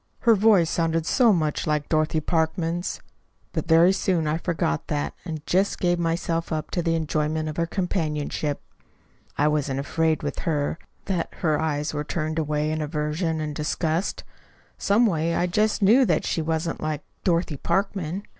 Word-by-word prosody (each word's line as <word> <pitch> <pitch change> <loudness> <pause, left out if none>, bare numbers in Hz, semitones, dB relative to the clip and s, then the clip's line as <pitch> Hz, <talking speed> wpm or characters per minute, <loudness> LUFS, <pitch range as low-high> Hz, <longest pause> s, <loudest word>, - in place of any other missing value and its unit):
Her 235 - +6
voice 205 -5 +5
sounded 165 -1 0
so 235 +5 +4
much 160 -4 0
like 150 -1 0
Dorothy 155 0 +1
Parkman's. 165 +2 -1 0.5
But - - -2
very 165 +3 +6
soon 185 -4 0
I 155 +2 0
forgot 165 - -1
that, 75 0 -2
and 155 -3 -6
just 190 +3 +1
gave 175 -1 +1
myself 165 0 -1
up 155 -1 -3
to 175 - 0
the 165 -1 +1
enjoyment 155 0 -1
of 155 - -5
her 170 0 +1
companionship. 155 -5 -2 0.7
I 150 - +3
wasn't 145 -3 0
afraid 160 +3 0
with 145 -2 -3
her 150 0 -1 0.3
that 180 -4 -2
her 155 -3 +2
eyes 150 -2 -1
were 150 0 -2
turned 155 +1 -2
away 150 0 0
in 155 0 -2
aversion 155 +2 -1
and 155 -1 -3
disgust. 160 +4 -1 0.5
Some 210 +4 +3
way, 165 -4 +1
I 175 - +2
just 210 +4 +1
knew 230 +7 +6
that - - +1
she 165 - 0
wasn't 160 +1 -2
like 155 -1 -2 0.2
Dorothy 170 -4 +1
Parkman. 195 +1 -1
160 Hz, 165 wpm, -24 LUFS, 150-175 Hz, 0.7 s, Her